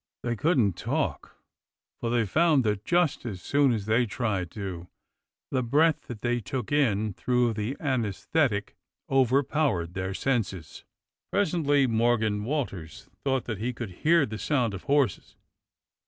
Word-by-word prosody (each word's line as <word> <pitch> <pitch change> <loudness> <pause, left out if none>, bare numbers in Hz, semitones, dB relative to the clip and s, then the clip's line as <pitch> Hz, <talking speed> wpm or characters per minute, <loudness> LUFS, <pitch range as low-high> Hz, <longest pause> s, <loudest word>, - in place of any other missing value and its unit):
They 120 -1 -1
couldn't 120 - +2
talk, - - -2 0.6
for 115 - -2
they 120 -1 +2
found 155 - +3
that, 105 -2 -1
just 175 +2 +1
as 105 -7 -5
soon 140 +7 +2
as 110 -4 -2
they 115 +3 +2
tried 100 -6 -2
to, 90 -3 -6 0.6
the 130 - +1
breath 150 +6 +2
that 120 -3 -7
they 120 0 0
took 120 +4 -5
in 110 -8 +2
through 125 +3 +1
the 110 +5 -3
ansesthetic 120 -2 0 0.4
overpowered 130 - +2
their 95 0 -3
senses. 100 - -2 0.5
Pres 200 -5 +1
ently 145 -5 +3
INIorgan 110 -3 +1
Walters 115 - -4
thought 135 -2 0
that 110 -5 -4
he 120 +3 -2
could 115 -4 -6
hear 165 -1 +4
the 110 -3 -6
sound 120 -1 0
of 95 - -8
horses. 140 -7 +1
120 Hz, 145 wpm, -27 LUFS, 105-140 Hz, 0.6 s, hear